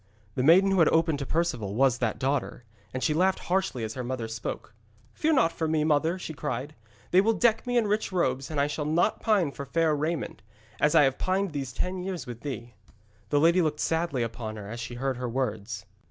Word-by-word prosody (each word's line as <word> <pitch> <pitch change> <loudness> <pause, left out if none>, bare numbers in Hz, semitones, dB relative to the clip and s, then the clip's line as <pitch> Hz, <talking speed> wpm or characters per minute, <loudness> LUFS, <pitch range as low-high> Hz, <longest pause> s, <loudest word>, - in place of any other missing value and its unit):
The 125 - -1
maiden 180 +8 +6
who 190 - +2
had 165 - +6
opened 160 -3 +2
to 140 - -4
Perceval 155 - -1
was 130 -1 +3
that 115 -3 -1
daughter, 135 -2 -2 0.3
and 130 - -4
she 155 - +2
laughed 185 +4 +2
harshly 180 -10 -1
as 110 0 -4
her 130 - -5
mother 120 -2 -3
spoke. 110 -1 -6 0.4
'Fear 320 +1 +1
not 210 - +4
for 160 -1 -2
me, 155 -1 +1
mother,' 160 +3 +2
she 170 -3 -6
cried. 135 +1 -4 0.4
'They 185 - +6
will 225 +3 +2
deck 225 +1 +2
me 245 0 +1
in 235 - +3
rich 210 0 0
robes, 135 -7 0
and 155 -2 -2
I 140 - +3
shall 150 0 -3
not 165 +7 +1
pine 200 -9 +2
for 140 - -7
fair 160 +1 +2
raiment, 155 -6 -3 0.4
as 150 - +3
I - - +7
have 135 -1 +1
pined 190 0 0
these 140 -4 -4
ten 180 +8 -3
years 185 -3 -4
with 120 -3 -8
thee.' 120 -4 -6 0.6
The 145 - +3
lady 170 +4 +5
looked 150 -2 -1
sadly 160 -6 0
upon 115 -1 -5
her 105 -2 -8
as 120 - -6
she 115 +1 -6
heard 130 +1 -2
her 125 -1 -3
words. 110 -5 -3
150 Hz, 225 wpm, -27 LUFS, 125-175 Hz, 0.6 s, I